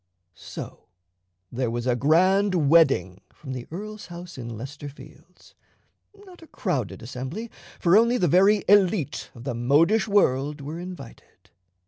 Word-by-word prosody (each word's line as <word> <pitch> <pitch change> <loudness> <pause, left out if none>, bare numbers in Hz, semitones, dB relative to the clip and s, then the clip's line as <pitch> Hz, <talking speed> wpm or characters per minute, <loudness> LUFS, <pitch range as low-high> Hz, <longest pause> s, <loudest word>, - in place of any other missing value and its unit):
So - - -10 0.6
there 125 0 -2
was 120 +1 -3
a 125 -2 +2
grand 175 - +3
wedding 100 - +3
from 135 -3 -9
the 125 -2 -7
earl's 210 +4 -8
house 175 0 -10
in 115 -3 -7
Leicester 145 +4 -8
Fields; 140 - -17 0.7
not 360 -3 -15
a 325 - -14
crowded 155 - -3
assembly, 130 - -6 0.3
for 175 +2 +4
only 235 +3 +4
the 180 - +2
very 195 +5 +4
élite 195 - +2
of 115 - -11
the 130 - -3
modish 155 - +2
world 150 -8 +1
were 150 +4 -7
invited. 180 - -11
160 Hz, 140 wpm, -25 LUFS, 130-195 Hz, 0.7 s, for